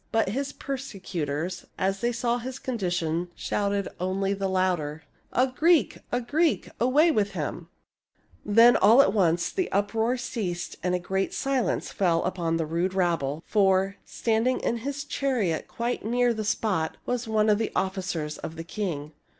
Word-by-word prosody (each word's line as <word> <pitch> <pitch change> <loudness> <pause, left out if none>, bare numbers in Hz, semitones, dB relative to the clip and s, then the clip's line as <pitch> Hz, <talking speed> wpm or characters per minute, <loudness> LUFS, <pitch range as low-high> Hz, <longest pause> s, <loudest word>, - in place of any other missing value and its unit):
But 225 -4 +2
his 275 +7 -2
per 275 -1 -4
secutors, 180 - -4
as 195 +1 0
they 240 - +1
saw 240 0 0
his 255 +2 -6
condition, 175 -9 -2
shouted 200 -1 -1
only 190 +2 0
the 195 0 -2
louder, 180 -5 0 0.2
" - - -40
A 255 - +3
Greek! 305 +2 +2
a 245 - +1
Greek! 305 +7 0
Away 290 +8 +4
with 205 -7 0
him! 155 -6 -4 0.4
" 90 - -35
Then, 230 +4 +6
all 230 +7 +7
at 195 - +1
once, 175 -4 +2
the 370 -2 -2
uproar 220 +5 +1
ceased 195 -8 -4
and 180 0 +1
a - - 0
great 190 +2 -2
silence 270 -3 0
fell 170 -4 +1
upon 170 -3 -1
the 165 - -1
rude 170 +4 -1
rabble; 165 -5 0
for, 195 -1 +2
standing 230 +3 0
in 235 - 0
his 280 +4 -4
chariot 255 - -1
quite 240 +1 -3
near 240 +2 +2
the 215 -1 -3
spot, 205 -6 0
was 245 -1 -2
one 215 -1 +2
of 210 -1 +4
the 225 - -1
officers 185 -5 -2
of 160 - -6
the 165 - -6
king. 165 -5 -4
200 Hz, 170 wpm, -26 LUFS, 175-240 Hz, 0.4 s, all